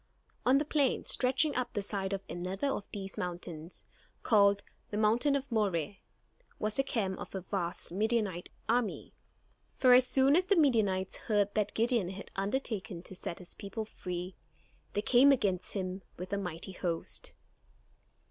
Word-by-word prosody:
On 260 +2 +6
the 295 - +1
plain, 285 -3 +1
stretching 265 +4 +2
up 250 -1 -2
the 205 -3 -2
side 195 -1 -2
of 195 -1 -2
another 185 +7 -3
of 205 -6 -2
these 195 -2 -6
mountains, 175 -2 -6 0.4
called 200 -2 +4 0.3
"the 205 - -3
Hill 230 +7 +3
of 275 -1 -3
Moreh," 200 -5 0 0.6
was 215 0 -2
the - - +5
camp 200 -8 -2
of - - -8
a 190 - -2
vast 180 -3 -3
Midianite 210 -2 0 0.2
army. 235 -2 0 0.6
For 255 -2 +6
as 250 0 +7
soon 270 +2 +5
as 365 +2 +3
the 400 - +3
Midianites 215 - +2
heard 205 -2 +1
that 210 -1 0
Gideon 230 -5 +2
had 195 +1 -8
undertaken 195 -4 -2
to 190 - -10
set 175 - -5
his 180 - -6
people 215 +2 -5
free, 180 -3 -6 0.6
they 205 - -1
came 255 +4 +6
against 190 -9 +1
him 185 -1 -3 0.2
with 185 +3 -6
a - - +1
mighty 180 0 -4
host. 175 -3 -4
205 Hz, 160 wpm, -32 LUFS, 185-245 Hz, 0.6 s, as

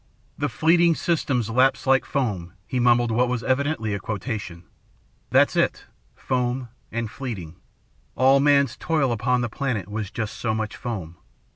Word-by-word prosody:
"'The - - 0
fleeting 170 +1 +3
systems 140 -10 0
lapse 130 +3 +3
like 135 -1 +3
foam,'" 100 -11 -2
he 130 - -2
mumbled 120 -1 +3
what 120 +2 +2
was 125 -1 -2
evidently 130 -5 0
a 100 - -2
quotation. 105 -4 -5 0.7
"That's - - +4
it - - +1 0.3
foam, 125 -1 -2 0.2
and 115 0 -2
fleeting. 95 - -6 0.6
All 135 +2 +5
man's 140 -3 +3
toil 155 -5 0
upon 125 +2 +1
the 120 - 0
planet 115 -6 -3
was 105 -1 -4
just 110 -1 -4
so 110 -2 -1
much 110 -1 -3
foam. 90 -9 -6
120 Hz, 150 wpm, -24 LUFS, 110-135 Hz, 0.7 s, All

